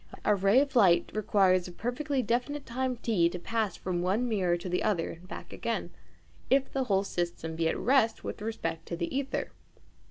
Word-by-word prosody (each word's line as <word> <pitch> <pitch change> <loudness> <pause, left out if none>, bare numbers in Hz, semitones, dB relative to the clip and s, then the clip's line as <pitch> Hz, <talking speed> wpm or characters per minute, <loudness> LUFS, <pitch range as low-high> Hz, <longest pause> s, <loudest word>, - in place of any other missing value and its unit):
A 210 - +5
ray 200 +5 +4
of 285 -1 -2
light 190 -7 +5
requires 190 -4 +3
a - - -8
perfectly 255 - -2
definite 260 +5 -1
time 255 +1 -2
T 205 -8 +2
to 180 - -5
pass 215 +1 -1
from 180 -2 -2
one 200 +7 +1
mirror 185 -6 +1
to 175 - -7
the 180 0 0
other 175 -6 0
and 175 +2 -12
back - - -8
again, - - -3 0.6
if 270 0 +3
the 265 -1 0
whole 195 -4 +2
system 170 -3 -3
be 165 0 +1
at - - -1
rest 245 -3 +2
with - - -5
respect 165 -7 -4
to 170 - -3
the 170 -1 -2
ćther. 270 0 -2
205 Hz, 195 wpm, -29 LUFS, 175-245 Hz, 0.6 s, A